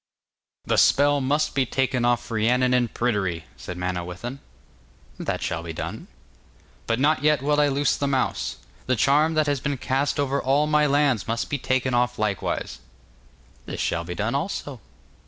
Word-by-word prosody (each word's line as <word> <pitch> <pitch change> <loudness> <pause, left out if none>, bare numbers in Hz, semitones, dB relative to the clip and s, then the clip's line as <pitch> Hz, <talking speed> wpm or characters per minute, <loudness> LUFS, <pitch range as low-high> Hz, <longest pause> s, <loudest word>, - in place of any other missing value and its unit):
'The - - +2
spell 145 0 +4
must 145 +4 +1
be 135 - +2
taken 130 0 0
off 120 0 +1
Rhiannon 125 +3 +2
and 120 -2 +2
Pryderi,' 95 -8 -1
said 90 - -8
Manawyddan. 90 +8 -4 0.8
'That - - -3
shall 85 - -2
be 85 -1 -6
done.' - - -6 0.8
'But 115 +1 0
not 145 0 +3
yet 150 -2 +2
will 150 +1 +3
I 145 - +4
loose 140 -1 +1
the 140 - -1
mouse. 135 -2 -1 0.3
The 130 - +2
charm 150 +7 +3
that 155 -1 +3
has 145 -2 0
been 140 +2 -2
cast 135 +3 -1
over 140 0 0
all 140 +3 +2
my 150 0 +3
lands 140 -6 +2
must 115 +1 -2
be 145 - -1
taken 130 0 0
off 125 0 +1
likewise.' 105 -2 -2 0.9
'This - - -5
shall 85 0 -1
be 90 +1 -6
done - - -1
also. - - -3
130 Hz, 170 wpm, -24 LUFS, 115-145 Hz, 0.9 s, spell